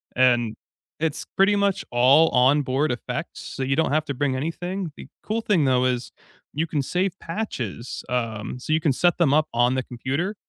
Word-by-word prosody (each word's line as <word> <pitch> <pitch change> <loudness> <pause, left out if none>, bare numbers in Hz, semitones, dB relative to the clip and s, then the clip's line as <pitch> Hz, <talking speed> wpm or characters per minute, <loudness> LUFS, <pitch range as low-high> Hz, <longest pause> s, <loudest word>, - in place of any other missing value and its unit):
and 120 -3 +3 0.4
it's 155 -2 -2
pretty 200 +2 +4
much 200 -1 +1
all 135 +7 +5
onboard 135 +2 +2
effects, 120 - -5
so 135 - -5
you 135 +1 +1
don't 160 -1 +1
have 155 +1 +1
to 140 - -3
bring 135 0 0
anything. 175 +4 -3
The - - -10 0.2
cool 225 +2 -1
thing, 185 -9 +2
though, 130 -1 +3
is 125 -1 -1 0.4
you 160 +3 -1
can 150 -2 -1
save 185 +6 -1
patches, 130 - -5
um, 115 -2 -3
so 155 - -2
you 160 - +3
can 145 -5 +2
set 175 +5 +2
them 160 -6 +3
up 155 +1 +3
on 120 +2 +3
the 130 - -1
computer, 140 - -3
140 Hz, 190 wpm, -24 LUFS, 125-165 Hz, 0.4 s, all